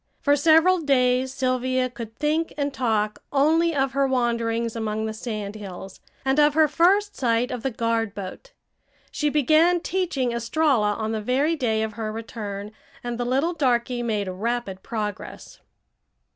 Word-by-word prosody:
For 285 -1 +3
several 325 +5 +5
days 255 -3 +2
Sylvia 255 -1 0
could 230 -3 -9
think 310 +2 -1
and 285 -1 -1
talk 215 -5 -1
only 320 +4 +3
of 270 -1 +1
her 275 0 +1
wanderings 235 -2 0
among 220 -1 -2
the 220 - -3
sand 215 -3 -5
hills, 195 -2 -9 0.3
and 265 +2 +2
of 295 0 +4
her 315 -1 +5
first 385 +7 +2
sight 240 0 0
of 250 - -4
the 270 - -1
guard 230 -3 -1
boat. 200 - -8 0.6
She 300 - 0
began 310 +5 +4
teaching 335 -9 -1
Estralla 235 -2 +1
on 220 0 -3
the 220 -1 -2
very 275 +9 +1
day 220 -7 0
of 220 -1 -4
her 220 0 -4
return, 210 -2 -6 0.3
and 240 0 -4
the 245 - -1
little 275 +8 +1
darky 250 -5 0
made 215 -4 -1
rapid 195 0 -3
progress. 210 -2 -6
245 Hz, 160 wpm, -24 LUFS, 220-290 Hz, 0.6 s, several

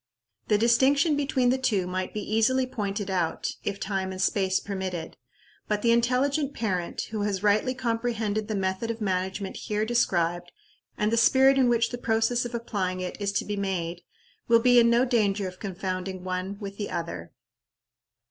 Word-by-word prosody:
The 210 - +3
distinction 270 +7 +3
between 275 -3 +1
the 260 - 0
two 210 -8 +1
might 185 +1 -3
be 210 - -4
easily 225 +5 +2
pointed 205 -5 -3
out, 175 -3 -1
if 200 -1 -3
time 190 -2 -2
and 185 - -7
space 190 0 +1
permitted; 185 -4 -5 0.5
but 210 -1 -1
the 235 - +4
intelligent 270 +5 +1
parent, 185 -6 -2
who 215 -2 -2
has 200 -1 -1
rightly 210 +5 +2
comprehended 230 -4 -1
the 215 - -2
method 190 +3 -1
of 230 0 -3
management 190 -1 -2
here 210 0 -2
described, 175 -7 0 0.5
and 210 +1 +1
the 230 - +2
spirit 265 +3 +5
in 255 -2 +4
which 235 -1 +2
the 245 - -5
process 230 +1 +1
of 240 0 -5
applying 195 -6 -2
it 185 0 -4
is 200 -1 0
to - - -1
be 205 - -3
made, 180 -4 -3 0.5
will 230 - +6
be 245 +1 +5
in 235 0 +5
no 235 +2 +4
danger 210 -5 +1
of 185 0 -9
confounding 185 -1 -4
one 185 +2 -3
with 200 -2 -7
the 205 - -4
other. 165 - -5
210 Hz, 175 wpm, -26 LUFS, 190-235 Hz, 0.5 s, will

